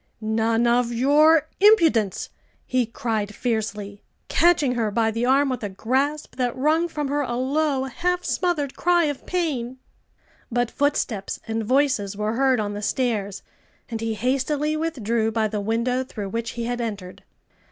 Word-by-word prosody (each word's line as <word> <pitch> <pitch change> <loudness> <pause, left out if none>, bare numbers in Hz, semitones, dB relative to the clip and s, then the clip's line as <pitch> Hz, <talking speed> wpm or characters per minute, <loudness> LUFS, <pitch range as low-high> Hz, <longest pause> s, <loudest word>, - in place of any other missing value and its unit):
"None 225 +1 +1
of 240 0 +2
your 300 +6 +4
impudence!" 325 - +4 0.3
he 255 -2 0
cried 215 -3 -3
fiercely, 210 -4 -3 0.3
catching 330 -7 +3
her 230 -3 0
by 225 +2 +1
the 230 +2 -1
arm 275 +2 +4
with 255 -2 -2
a 205 - -2
grasp 265 +11 -1
that 245 -1 -1
wrung 310 +6 +2
from 300 -4 -3
her 290 +1 0
a 240 -4 -2
low, 275 +2 0
half 355 +7 -1
smothered 310 -7 -1
cry 350 0 +3
of 290 -3 -3
pain. 270 -9 -2 0.7
But 240 0 0
footsteps 260 -8 -1
and 225 0 -2
voices 255 -5 +1
were 210 +1 -1
heard 260 0 +2
on 205 -1 -2
the 205 - -5
stairs, 210 -4 -1 0.5
and 225 -1 -3
he 225 -1 -2
hastily 275 +6 0
withdrew 235 -8 -1
by 220 -1 +1
the 210 0 -3
window 235 +4 0
through 210 -6 -6
which 230 +3 -3
he 235 - -2
had 240 +1 -2
entered. 200 -5 -6
245 Hz, 160 wpm, -23 LUFS, 220-285 Hz, 0.7 s, your